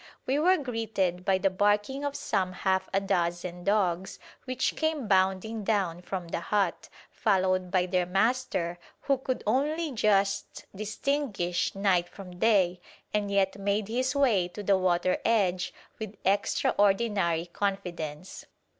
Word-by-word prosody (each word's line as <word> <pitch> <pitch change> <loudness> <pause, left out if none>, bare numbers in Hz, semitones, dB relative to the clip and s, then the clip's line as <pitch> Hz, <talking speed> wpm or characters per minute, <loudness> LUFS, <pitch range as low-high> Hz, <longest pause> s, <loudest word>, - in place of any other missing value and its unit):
We 270 +3 +1
were 365 +4 +4
greeted 220 - -2
by 195 -1 +3
the 190 +1 +1
barking 205 +8 +1
of 285 -1 -2
some 185 -7 -1
half 190 0 0
a 195 - +2
dozen 175 -2 -2
dogs 190 -3 0 0.3
which 255 0 -1
came 315 -6 -1
bounding 190 +3 +1
down 190 -5 0
from 180 -2 -5
the - - -2
hut, 190 0 -1 0.2
followed 185 -3 +1
by 180 -1 +2
their 180 -1 0
master 195 -4 0 0.2
who 275 -2 +1
could 255 -1 -3
only 300 +8 0
just 200 -4 +1
distinguish 210 -5 -1
night 190 -3 +2
from 180 -3 -11
day, 185 -5 +3 0.3
and 210 -1 0
yet 195 0 +1
made 200 +1 -1
his 255 +3 0
way 230 -11 +3
to 205 +4 -8
the 200 0 +4
water 185 -1 +1
edge 185 -6 +1 0.3
with 215 -2 -6
extraordinary 195 -2 +2
confidence. 180 -4 -4
195 Hz, 135 wpm, -28 LUFS, 180-220 Hz, 0.3 s, were